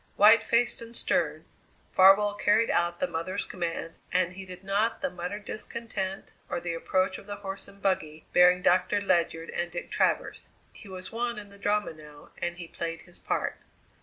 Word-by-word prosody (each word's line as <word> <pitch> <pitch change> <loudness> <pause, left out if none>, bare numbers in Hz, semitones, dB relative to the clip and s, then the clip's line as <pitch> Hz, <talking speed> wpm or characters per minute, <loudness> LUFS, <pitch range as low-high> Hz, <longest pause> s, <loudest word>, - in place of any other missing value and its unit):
White 215 +2 +7
faced 240 +1 +1
and 230 0 -2
stern, - - +1 0.5
Farwell 195 +2 +6
carried 210 +2 +3
out 175 0 +1
the - - +2
mother's 170 +2 -3
commands 165 -2 -4
and 180 0 +2
heeded 185 -1 -9
not 205 +5 0
the 275 - 0
muttered 180 +4 -5
discontent 200 -4 -4 0.2
or - - -1
the 170 0 -3
approach 185 +3 0
of 195 - -15
the 205 - -4
horse 195 -1 -6
and 200 0 -16
buggy 155 -5 -1
bearing 180 0 +6
Doctor 185 +3 +3
Ledyard 170 -4 0
and 175 0 -2
Dick 175 - -6
Travers. - - 0 0.2
He 210 - -13
was 185 -1 -6
one 235 0 -2
in 205 -1 -8
the 200 0 -15
drama 205 -2 0
now 150 -1 -14
and 175 0 -2
he 170 -1 -7
played 165 0 -5
his 175 -1 -11
part. - - -2
190 Hz, 180 wpm, -28 LUFS, 175-205 Hz, 0.5 s, White